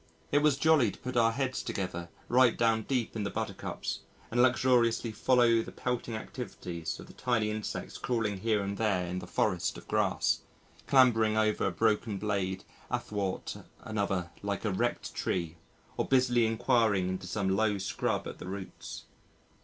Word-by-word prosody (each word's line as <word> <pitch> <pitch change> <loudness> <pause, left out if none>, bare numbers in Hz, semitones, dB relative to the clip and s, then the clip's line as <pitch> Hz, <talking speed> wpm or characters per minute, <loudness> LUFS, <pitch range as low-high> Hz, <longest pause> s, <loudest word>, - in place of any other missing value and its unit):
It 145 - +5
was 145 -2 +3
jolly 155 -6 +4
to - - -9
put 130 0 -6
our 115 -1 +4
heads 130 +1 -1
together 90 -3 -4 0.2
right 125 -1 +4
down 110 -1 +2
deep 125 -5 -1
in 110 - -2
the 100 - -1
Buttercups - - -4 0.3
and 120 +2 +3
luxuriously 120 -2 +3
follow 115 0 +4
the - - -8
pelting 125 -2 -3
activities 90 -8 -5
of - - -9
the - - -14
tiny 110 -4 0
insects 110 -1 -5
crawling 110 -5 -1
here 105 0 +1
and 100 0 -4
there 100 -5 +1
in 90 +1 -3
the 90 - -9
forest 90 -3 0
of - - -12
grass, - - +1 0.5
clambering 115 -5 +5
over 110 -1 +2
a - - 0
broken 110 -1 +1
blade 95 -2 -1 0.3
athwart 100 -3 -3 0.2
another 100 -5 -2
like 100 +1 -3
a 105 - +1
wrecked 120 +6 -1
tree 85 -2 -2 0.4
or - - 0
busily 125 -3 +4
enquiring 110 -4 +2
into 95 0 -4
some 95 0 0
low 105 0 +2
scrub 95 - -1
at - - -8
the - - -7
roots. 95 0 -7
110 Hz, 165 wpm, -30 LUFS, 95-120 Hz, 0.5 s, It